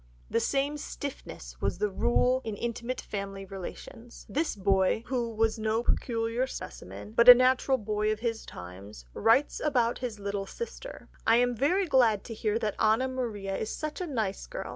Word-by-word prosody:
The 230 - +2
same 280 +5 0
stiffness - - -7
was - - 0
the 210 +1 0
rule 250 +5 +2
in 220 -2 -4
intimate 235 +2 -3
family 195 -1 -5
relations. 195 +5 -9
This 305 -1 -1
boy, 195 +2 +2
who 240 -3 -1
was 225 0 +1
no 220 +1 0
peculiar 230 +1 0
specimen, 215 - -8
but 235 +2 +6
a 245 - +14
natural 255 +1 +3
boy 215 -1 -1
of 215 - -2
his 230 -2 -2
times, 90 - -10
writes 245 +6 +3
about 245 -6 +1
his 245 -4 -4
little 200 -1 -3
sister: 475 - -8 0.2
"I 225 - +6
am 245 0 +3
very 355 - +2
glad 240 - +3
to 230 - -7
hear 215 0 0
that 215 -2 -1
Anna 220 +4 +3
Maria 220 -7 -3
is 215 - -3
such 310 +4 -5
a 360 - -2
nice 220 -9 -2
girl. - - -6
230 Hz, 175 wpm, -29 LUFS, 205-255 Hz, 0.2 s, a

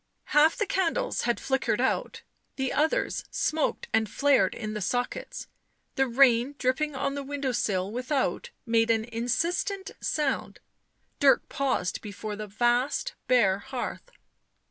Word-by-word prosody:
Half 305 +2 +6
the 420 - +1
candles 380 -4 0
had 240 - +1
flickered 265 -1 0
out; - - -1 0.3
the 265 -1 -1
others 310 +2 +1
smoked 310 -1 -1
and 220 -1 +2
flared 275 -8 +3
in 215 -2 -5
the 210 - -4
sockets; 245 - -3 0.5
the 270 0 +1
rain 250 +1 +4
dripping 285 +3 0
on 275 +1 -1
the 285 - -3
window 275 -1 -3
sill 195 -5 -1
without 260 - -1 0.2
made 230 -1 +2
an 225 -1 +2
insistent 335 - -1
sound. 295 -3 -1 0.6
Dirk 280 -2 +4
paused 260 -10 -1
before 210 0 -6
the 210 0 -6
vast 245 - +1
bare 205 -7 +4
hearth. 255 - -6
260 Hz, 135 wpm, -27 LUFS, 225-290 Hz, 0.6 s, Half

